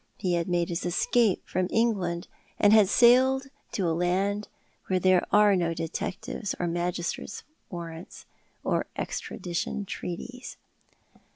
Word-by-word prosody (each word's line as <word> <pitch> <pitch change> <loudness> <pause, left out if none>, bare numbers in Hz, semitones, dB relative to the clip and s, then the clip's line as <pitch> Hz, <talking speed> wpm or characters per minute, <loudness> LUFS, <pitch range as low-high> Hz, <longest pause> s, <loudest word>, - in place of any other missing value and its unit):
He 180 -2 -1
had 170 -1 0
made 175 -1 +1
his 170 +1 -2
escape 195 +4 +1
from 185 0 0
England, 190 -7 0 0.3
and 205 +1 +5
had 215 -3 +6
sailed 260 +4 +5 0.3
to 190 -4 0
a 165 - +1
land 190 +5 0 0.4
where 185 -1 +1
there 185 0 +4
arc 205 -2 +5
no 170 -1 0
detectives 170 +4 -4
or 175 - 0
magistrates' 175 +3 -3 0.3
warrants, 170 -1 -8 0.4
or - - 0
extradition 185 +1 -4
treaties. 245 +8 -6
185 Hz, 125 wpm, -27 LUFS, 175-210 Hz, 0.4 s, had